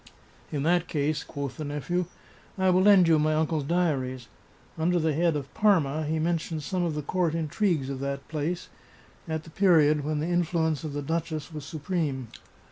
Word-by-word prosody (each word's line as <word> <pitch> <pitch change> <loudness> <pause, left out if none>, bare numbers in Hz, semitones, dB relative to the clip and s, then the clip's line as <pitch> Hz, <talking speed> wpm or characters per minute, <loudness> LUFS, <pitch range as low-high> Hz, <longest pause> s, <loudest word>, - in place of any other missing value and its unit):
" - - -28
In 140 - -1
that 175 +2 +2
case," 150 +1 -1
quoth 140 -4 -6
the 155 - -4
nephew, 150 +5 -2 0.3
" - - -27
I 190 -1 +3
will 180 +1 +4
lend 195 -3 +6
you 160 -2 +5
my 155 +1 +2
uncle's 155 -1 0
diaries. 135 -7 -1 0.5
Under 170 +2 +1
the 160 -2 +1
head 165 +1 +2
of 140 -2 -5
Parma 160 -8 +2
he 160 +1 0
men 165 +1 +1
tions 155 -2 -5
some 185 -2 -1
of 165 -3 -1
the 150 - -3
court 170 +1 0
intrigues 165 -2 0
of 135 -1 -4
that 140 0 -4
place, 160 +3 -3 0.6
at 160 -1 -3
the 160 - -13
period 155 -6 +4
when 155 +1 -1
the 155 - -1
influence 165 -3 0
of 155 -2 -4
the 145 0 -3
duchess 160 +1 -3
was 150 -2 -6
supreme. 145 - -3
155 Hz, 200 wpm, -27 LUFS, 145-175 Hz, 0.6 s, lend